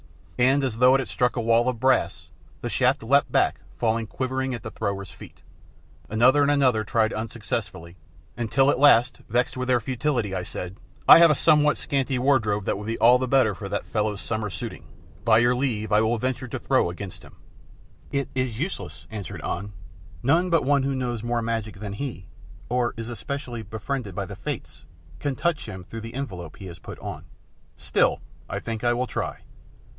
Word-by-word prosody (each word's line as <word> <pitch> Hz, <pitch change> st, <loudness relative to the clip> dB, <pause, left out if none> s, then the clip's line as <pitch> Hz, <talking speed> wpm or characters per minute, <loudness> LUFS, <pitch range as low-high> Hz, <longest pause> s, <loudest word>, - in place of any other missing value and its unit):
And 135 Hz, +3 st, +4 dB
as 125 Hz, -4 st, -1 dB
though 125 Hz, +1 st, +6 dB
it -, -, +3 dB
had 135 Hz, -, -3 dB
struck 125 Hz, -1 st, 0 dB
a 120 Hz, -, -1 dB
wall 115 Hz, +2 st, +3 dB
of 125 Hz, -3 st, -4 dB
brass, 95 Hz, -10 st, +1 dB, 0.3 s
the 120 Hz, -, -3 dB
shaft 125 Hz, +2 st, +2 dB
leapt 140 Hz, +5 st, +3 dB
back -, -, +2 dB, 0.2 s
falling 115 Hz, -1 st, 0 dB
quivering 130 Hz, +2 st, -2 dB
at 115 Hz, -, -9 dB
the -, -, -6 dB
thrower's 100 Hz, -3 st, -3 dB
feet. -, -, -14 dB, 0.7 s
Another 125 Hz, +7 st, +4 dB
and 140 Hz, -, +3 dB
another 130 Hz, -6 st, +3 dB
tried 110 Hz, +1 st, +1 dB
unsuccessfully, 90 Hz, -5 st, -4 dB, 0.4 s
until 130 Hz, +4 st, +2 dB
at 125 Hz, -, -1 dB
last, 125 Hz, -3 st, +5 dB
vexed 120 Hz, +3 st, +1 dB
at 130 Hz, 0 st, -3 dB
their 125 Hz, -1 st, +3 dB
futility, 125 Hz, -3 st, -1 dB
I 95 Hz, -, -1 dB
said, 90 Hz, +1 st, -6 dB, 0.3 s
"I -, -, +11 dB
have 170 Hz, 0 st, +8 dB
a 150 Hz, -, +4 dB
somewhat 150 Hz, 0 st, +4 dB
scanty 135 Hz, -1 st, -1 dB
wardrobe 115 Hz, -7 st, +2 dB
that -, -, -1 dB
would 105 Hz, -, -7 dB
be 115 Hz, -, -2 dB
all 120 Hz, +3 st, +6 dB
the 130 Hz, -, -1 dB
better 130 Hz, -5 st, +3 dB
for 85 Hz, -, -7 dB
that -, -, -2 dB
fellow's 105 Hz, -2 st, -1 dB
summer 110 Hz, -2 st, -3 dB
suiting, -, -, -7 dB, 0.4 s
by 110 Hz, 0 st, +5 dB
your 120 Hz, +2 st, +4 dB
leave 115 Hz, -5 st, -1 dB
I 105 Hz, +1 st, +5 dB
will 110 Hz, +2 st, +1 dB
venture 130 Hz, +2 st, -2 dB
a 130 Hz, -, -2 dB
throw 130 Hz, -5 st, +1 dB
against 90 Hz, +2 st, -8 dB
him." -, -, -16 dB, 0.8 s
"It 140 Hz, -1 st, -1 dB
is 130 Hz, -4 st, -1 dB
useless," 170 Hz, +6 st, -5 dB
answered 105 Hz, -6 st, -6 dB
An; 100 Hz, +3 st, -3 dB, 0.5 s
"none 165 Hz, +7 st, +3 dB
but 165 Hz, -4 st, +2 dB
one 140 Hz, 0 st, +3 dB
who 135 Hz, 0 st, -1 dB
knows 120 Hz, -3 st, -2 dB
more 120 Hz, 0 st, -1 dB
magic 115 Hz, -2 st, -2 dB
than 100 Hz, +1 st, -6 dB
he, 110 Hz, -5 st, -5 dB, 0.4 s
or 125 Hz, -1 st, 0 dB
is 115 Hz, +1 st, -5 dB
especially 120 Hz, 0 st, -5 dB
befriended 110 Hz, 0 st, -5 dB
by 100 Hz, -, -2 dB
the 100 Hz, +1 st, -8 dB
Fates 95 Hz, -, -7 dB, 0.3 s
can 140 Hz, +4 st, -2 dB
touch 170 Hz, -4 st, -1 dB
him 95 Hz, -4 st, -7 dB
through 115 Hz, +5 st, -8 dB
the 115 Hz, +2 st, -8 dB
envelope 90 Hz, -, -6 dB
he 95 Hz, -, -9 dB
has 85 Hz, -2 st, -9 dB
put -, -, -9 dB
on." -, -, -7 dB, 0.5 s
"Still, -, -, +1 dB, 0.3 s
I -, -, -3 dB
think 115 Hz, -1 st, -5 dB
I 120 Hz, 0 st, +3 dB
will 125 Hz, +1 st, 0 dB
try." -, -, -4 dB
120 Hz, 195 wpm, -25 LUFS, 110-130 Hz, 0.8 s, I